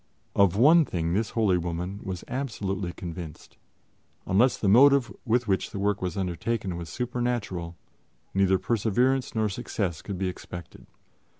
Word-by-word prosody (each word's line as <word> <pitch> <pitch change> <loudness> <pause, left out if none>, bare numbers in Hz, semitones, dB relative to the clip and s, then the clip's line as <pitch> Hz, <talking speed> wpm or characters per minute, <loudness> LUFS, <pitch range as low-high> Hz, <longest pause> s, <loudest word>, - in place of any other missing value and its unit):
Of 100 -3 +4
one 155 +9 +6
thing 85 - -2
this 105 +3 0
holy 100 -5 +3
woman 90 +3 -4
was 95 -2 -5
absolutely 100 -8 -3
convinced 85 -3 -8 0.7
unless 115 +7 +3
the 105 - -1
motive 135 +4 +5
with 120 0 +1
which 95 -1 0
the - - -7
work 100 +1 0
was 90 -1 -3
undertaken 95 +2 -2
was 85 -1 -6
supernatural, 120 -7 -3 0.6
neither 95 -1 +3
perseverance 120 +6 +1
nor 110 -1 +2
success 100 -5 -3
could 100 -3 -5
be 95 0 -1
expected. 90 -2 -8
100 Hz, 140 wpm, -27 LUFS, 90-120 Hz, 0.7 s, one